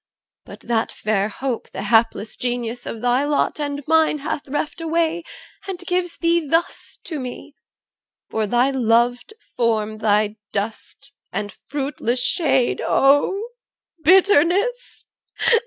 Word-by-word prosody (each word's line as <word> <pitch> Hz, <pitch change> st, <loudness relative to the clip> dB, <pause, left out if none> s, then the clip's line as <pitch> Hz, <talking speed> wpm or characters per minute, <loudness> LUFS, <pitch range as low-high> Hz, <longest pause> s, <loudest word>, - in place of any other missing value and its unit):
But -, -, -12 dB
that 230 Hz, -1 st, -1 dB
fair 210 Hz, -1 st, -1 dB
hope 250 Hz, +2 st, -4 dB
The 190 Hz, -, -6 dB
hapless 220 Hz, 0 st, +2 dB
Genius 245 Hz, -1 st, -3 dB
of 225 Hz, -, -5 dB
thy 245 Hz, +2 st, +2 dB
lot 290 Hz, +1 st, 0 dB
and 285 Hz, -1 st, -3 dB
mine 320 Hz, -1 st, +3 dB
Hath 290 Hz, 0 st, -4 dB
reft 295 Hz, +4 st, -3 dB
away, 330 Hz, +1 st, 0 dB, 0.5 s
and 385 Hz, -2 st, -4 dB
gives 360 Hz, -1 st, -2 dB
thee 340 Hz, 0 st, +2 dB
thus 325 Hz, +3 st, -1 dB
to 315 Hz, -4 st, -5 dB
me, 255 Hz, +3 st, -7 dB, 0.8 s
For 220 Hz, -1 st, 0 dB
thy 245 Hz, +5 st, +2 dB
loved 245 Hz, -, +1 dB, 0.2 s
form 220 Hz, -3 st, 0 dB
thy 210 Hz, 0 st, +1 dB, 0.2 s
dust 210 Hz, +2 st, -5 dB, 0.2 s
and 205 Hz, -2 st, -4 dB
fruitless 270 Hz, -3 st, -1 dB
shade 260 Hz, -1 st, +1 dB
O 290 Hz, -, +3 dB, 0.5 s
bitterness! 385 Hz, -, +3 dB
265 Hz, 125 wpm, -21 LUFS, 225-325 Hz, 0.8 s, mine